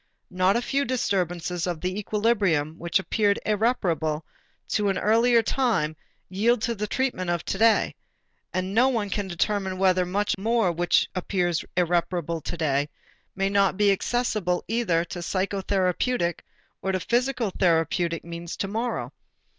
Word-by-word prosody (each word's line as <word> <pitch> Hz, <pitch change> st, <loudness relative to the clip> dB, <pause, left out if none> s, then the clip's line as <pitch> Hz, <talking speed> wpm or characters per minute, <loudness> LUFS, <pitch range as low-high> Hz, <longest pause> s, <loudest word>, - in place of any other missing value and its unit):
Not 185 Hz, +1 st, +2 dB
a 240 Hz, -, 0 dB
few 275 Hz, +3 st, 0 dB
disturbances 180 Hz, -, -1 dB
of 175 Hz, -3 st, -2 dB
the 185 Hz, +4 st, -2 dB
equilibrium 200 Hz, -8 st, +1 dB
which 170 Hz, -1 st, +1 dB
appeared 200 Hz, +1 st, +1 dB
irreparable 175 Hz, -9 st, 0 dB, 0.4 s
to 205 Hz, -1 st, +1 dB
an 195 Hz, -, 0 dB
earlier 230 Hz, +2 st, +4 dB
time 220 Hz, -, 0 dB, 0.3 s
yield 215 Hz, +5 st, +1 dB
to 235 Hz, -, 0 dB
the 210 Hz, -1 st, -3 dB
treatment 245 Hz, -8 st, -1 dB
of 175 Hz, -1 st, -1 dB
to 190 Hz, -, -3 dB
day, 225 Hz, 0 st, +4 dB, 0.6 s
and 185 Hz, +1 st, -2 dB
no 250 Hz, +5 st, +5 dB
one 215 Hz, -6 st, -1 dB
can 205 Hz, -2 st, -2 dB
determine 190 Hz, +1 st, -1 dB
whether 185 Hz, -1 st, +3 dB
much 200 Hz, +4 st, 0 dB
which 190 Hz, -6 st, +2 dB
appears 180 Hz, -2 st, -1 dB
irreparable 170 Hz, -1 st, 0 dB
today 145 Hz, -3 st, -1 dB, 0.5 s
may 195 Hz, 0 st, 0 dB
not 195 Hz, -2 st, +2 dB
be 205 Hz, -1 st, +4 dB
accessible 200 Hz, -4 st, 0 dB
either 195 Hz, -7 st, +1 dB
to 175 Hz, +1 st, -7 dB
psychotherapeutic 190 Hz, +1 st, 0 dB, 0.4 s
or 190 Hz, -, -1 dB
to 185 Hz, -, +1 dB
physical 240 Hz, 0 st, 0 dB
therapeutic 170 Hz, -1 st, +1 dB
means 170 Hz, 0 st, -6 dB
to 195 Hz, -, -2 dB
morrow. 230 Hz, +4 st, -3 dB
190 Hz, 140 wpm, -25 LUFS, 175-220 Hz, 0.6 s, no